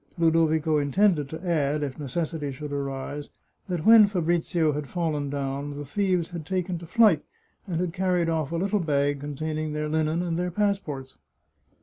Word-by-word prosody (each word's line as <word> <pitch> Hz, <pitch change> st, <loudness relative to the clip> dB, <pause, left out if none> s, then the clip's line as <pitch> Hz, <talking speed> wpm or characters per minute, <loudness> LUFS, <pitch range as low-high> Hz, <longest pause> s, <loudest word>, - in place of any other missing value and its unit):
Ludovico 160 Hz, -2 st, +3 dB
intended 150 Hz, 0 st, +2 dB
to 160 Hz, +4 st, -7 dB
add, 150 Hz, -3 st, +1 dB
if 140 Hz, 0 st, -5 dB
necessity 150 Hz, +1 st, -3 dB
should 145 Hz, +2 st, -7 dB
arise, 140 Hz, +1 st, -4 dB, 0.4 s
that 175 Hz, -3 st, -2 dB
when 225 Hz, -2 st, +9 dB
Fabrizio 170 Hz, -3 st, +1 dB
had 145 Hz, -1 st, -4 dB
fallen 155 Hz, -5 st, -1 dB
down, 140 Hz, +1 st, -3 dB
the 145 Hz, -, -5 dB
thieves 180 Hz, +2 st, 0 dB
had 170 Hz, -2 st, -5 dB
taken 180 Hz, +1 st, -2 dB
to 170 Hz, -, -10 dB
flight, 210 Hz, -7 st, +4 dB, 0.4 s
and 170 Hz, -3 st, -2 dB
had 175 Hz, -2 st, -1 dB
carried 180 Hz, -2 st, +1 dB
off 160 Hz, -3 st, -1 dB
a -, -, -2 dB
little 200 Hz, +4 st, +1 dB
bag 145 Hz, -4 st, +1 dB
containing 155 Hz, +2 st, -3 dB
their 150 Hz, 0 st, -2 dB
linen 160 Hz, +2 st, 0 dB
and 170 Hz, -1 st, -2 dB
their 180 Hz, 0 st, 0 dB
passports. 175 Hz, -9 st, -2 dB
160 Hz, 165 wpm, -26 LUFS, 145-175 Hz, 0.4 s, when